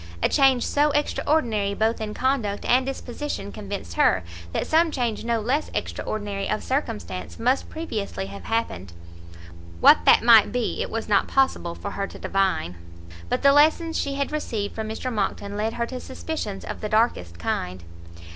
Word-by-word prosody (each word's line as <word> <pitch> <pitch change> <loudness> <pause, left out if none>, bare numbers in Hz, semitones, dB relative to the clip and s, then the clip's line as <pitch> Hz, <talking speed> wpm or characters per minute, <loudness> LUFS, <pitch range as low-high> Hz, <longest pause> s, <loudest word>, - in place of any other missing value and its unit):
A - - +4
change 270 -4 +4
so 295 +1 +2
extraordinary 235 -9 0
both 220 +2 0
in 210 -1 -4
conduct 250 -6 -1
and 255 +2 +3
disposition 265 -5 -5
convinced 200 - -6
her 90 +2 +3 0.3
that - - -1
some 325 +1 +3
change 245 -7 -2
no 230 0 0
less 260 +8 -1
extra - - -3
ordinary 205 -2 -3
of 215 - -1
circumstance 230 -8 -3
must 250 +4 +1
previously 210 - -4
have 100 +1 -9
happened; 95 - -2 0.9
what - - +8
that - - +6
might 230 -2 +7
be 245 -2 -1
it - - -2
was 225 0 -4
not 205 -2 +3
possible 265 -10 +1
for 200 - -6
her 200 0 -3
to - - -11
divine, 190 - 0 0.5
but - - -1
the 280 0 +7
lessons 320 +3 +4
she 280 -1 -1
had 280 +1 -2
received 225 -9 -3
from 220 -1 -4
Mr 250 +3 -4
Monckton 200 -1 -2
led 215 +2 -1
her 235 - -1
to 255 +1 -6
suspicions 260 -7 -5
of - - -6
the 215 - -3
darkest 210 - +1
kind. 90 +1 -3
225 Hz, 175 wpm, -24 LUFS, 200-270 Hz, 0.9 s, what